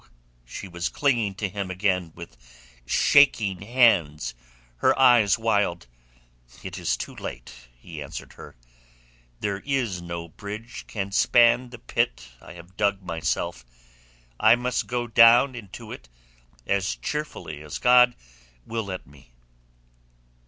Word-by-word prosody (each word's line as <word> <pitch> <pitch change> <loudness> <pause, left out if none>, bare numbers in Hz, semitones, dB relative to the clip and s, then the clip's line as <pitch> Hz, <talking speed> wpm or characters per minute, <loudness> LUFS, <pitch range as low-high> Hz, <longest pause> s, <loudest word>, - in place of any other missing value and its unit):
She 95 - -8
was 85 0 -3
clinging 120 -9 0
to 100 +1 -2
him 100 0 -5
again 95 -2 -1
with 85 -7 -11 0.5
shaking 110 -10 +3
hands, 100 - +2 0.4
her - - +2
eyes 120 -6 +5
wild. 105 - 0 0.8
"It - - -7
is - - -1
too - - -7
late," - - -8 0.3
he 80 +3 -9
answered 70 - -8
her. - - -13 0.9
"There 100 -1 -2
is 120 -9 -2
no 85 -1 -6
bridge 105 +7 -9
can 100 -2 -4
span 120 +4 +4
the 120 - -10
pit 65 - -2
I - - -12
have 85 +2 -14
dug 100 -1 0
myself. 80 -5 -3 0.8
I - - +6
must 125 0 -2
go 120 -1 -2
down 120 +3 +6
into 110 -6 -10
it - - -10 0.6
as 100 +2 0
cheerfully 150 - -5
as 75 -1 -7
God 125 0 +5 0.5
will 115 -2 -4
let 95 -2 -6
me." 70 -3 -20
100 Hz, 130 wpm, -25 LUFS, 85-120 Hz, 0.9 s, I